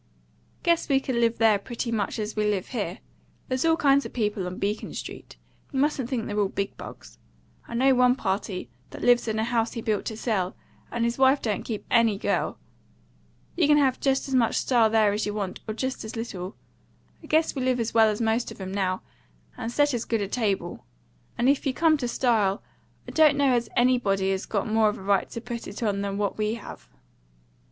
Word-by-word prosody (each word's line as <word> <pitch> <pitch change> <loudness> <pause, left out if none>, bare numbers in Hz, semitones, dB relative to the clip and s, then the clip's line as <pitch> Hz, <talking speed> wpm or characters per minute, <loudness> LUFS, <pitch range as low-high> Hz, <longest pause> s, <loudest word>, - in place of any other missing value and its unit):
"Guess 340 -3 +2
we 270 -1 +4
could 265 -1 -3
live 235 -1 +2
there 220 -3 +4
pretty 235 +2 -4
much 215 -3 -1
as 215 0 -4
we 210 -1 +1
live 195 -3 -2
here. 205 -7 -3 0.5
There's 255 0 -1
all 325 0 +3
kinds 280 -3 +4
of - - -7
people 210 -5 -1
on 180 - -6
Beacon 205 +2 -3
Street; - - -8 0.3
you 270 - -2
mustn't 275 -4 0
think 235 -4 -2
they're 210 0 -2
all 200 -2 +2
big 200 0 -3
bugs. - - -11 0.5
I 235 - -6
know 265 +3 +4
one 250 0 +4
party 190 -4 -3 0.2
that - - -9
lives 245 -1 +4
in 220 0 -1
a 220 - +1
house 230 -1 0
he 230 - -4
built 215 -2 -1
to 220 - -4
sell, 195 -6 -1 0.3
and 235 - -2
his 235 +2 -2
wife 265 +1 +5
don't 215 -3 -2
keep 220 -3 -5
any 230 -4 +4
girl. - - -1 1.0
You 335 -4 +3
can 295 0 +5
have 270 -3 +2
just 270 0 +1
as 270 - -4
much 240 -3 +3
style 235 -4 +3
there 215 -2 +3
as 210 +1 -1
you 205 - -3
want, 195 -3 -3
or 215 - -3
just 260 +3 -3
as 220 - -7
little. 200 -5 -5 0.7
I 310 - -13
guess 315 +1 +2
we 270 - -3
live 255 -1 +1
as 230 -1 -2
well 225 -1 +6
as 210 - -2
most 225 +1 0
of - - -11
'em 190 -1 -5
now, 185 -2 -1 0.5
and 225 - -4
set 290 +2 +2
as 240 -1 -2
good 225 -2 0
a - - -3
table. 205 -2 -2 0.5
And 240 - +2
if 280 0 +3
you 260 - 0
come 325 -1 +4
to 250 -4 -2
style, 225 -5 +1 0.4
I - - -6
don't 305 -3 +5
know 280 -2 +3
as 240 -2 0
anybody 205 -6 +2
has 190 0 -2
got 200 -3 -1
more 220 0 +3
of 210 - -4
a - - -10
right 200 -1 +1
to 230 - -6
put 240 -1 -6
it 205 +4 -6
on 200 -2 0
than 200 0 -3
what 205 0 -2
we 215 +1 0
have." - - -11
230 Hz, 225 wpm, -26 LUFS, 205-255 Hz, 1.0 s, well